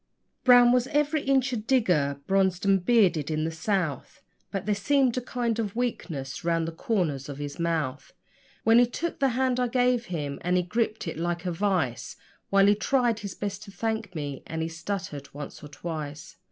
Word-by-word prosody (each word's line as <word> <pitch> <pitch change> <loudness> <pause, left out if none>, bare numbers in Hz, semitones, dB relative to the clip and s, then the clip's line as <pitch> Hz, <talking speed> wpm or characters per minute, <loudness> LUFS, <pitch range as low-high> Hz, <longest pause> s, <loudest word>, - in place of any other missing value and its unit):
Brown 245 -1 +7
was 250 0 +3
every 295 +1 +1
inch 270 -1 +2
a - - 0
digger 180 - +1
(bronzed 190 -1 +1
and 195 -2 +3
bearded 180 - +3
in 155 0 -1
the 160 - -1
South), 160 - -2 0.3
But 195 -2 -4
there 210 - +2
seemed 260 +4 +2
a 255 - -1
kind 240 -2 -2
of 210 -3 -2
weakness 150 - -3
round 165 -1 +1
the - - -3
corners 160 - -1
of 140 - -6
his 145 +1 -6
mouth 155 -5 -2 0.5
When 225 +1 +6
he 245 - +5
took 335 +7 -4
the 275 -1 +3
hand 255 -1 +1
I 250 - +2
gave 245 -1 +2
him; 145 -6 -4
and 180 +1 +1
he 180 - +2
gripped 220 +2 -1
it 165 - -4
like 170 +1 -2
a 180 - 0
vice, 175 - -1 0.3
While 195 0 +5
he 205 - +6
tried 235 +1 +1
his 200 -3 -6
best 200 -1 -4
to 200 - -11
thank 220 -3 -3
me, 145 -3 -4
and 160 0 -3
he 165 - -2
stuttered 165 -4 -5
once 145 0 -8
or - - -7
twice. 150 -1 -6
195 Hz, 195 wpm, -27 LUFS, 160-235 Hz, 0.5 s, Brown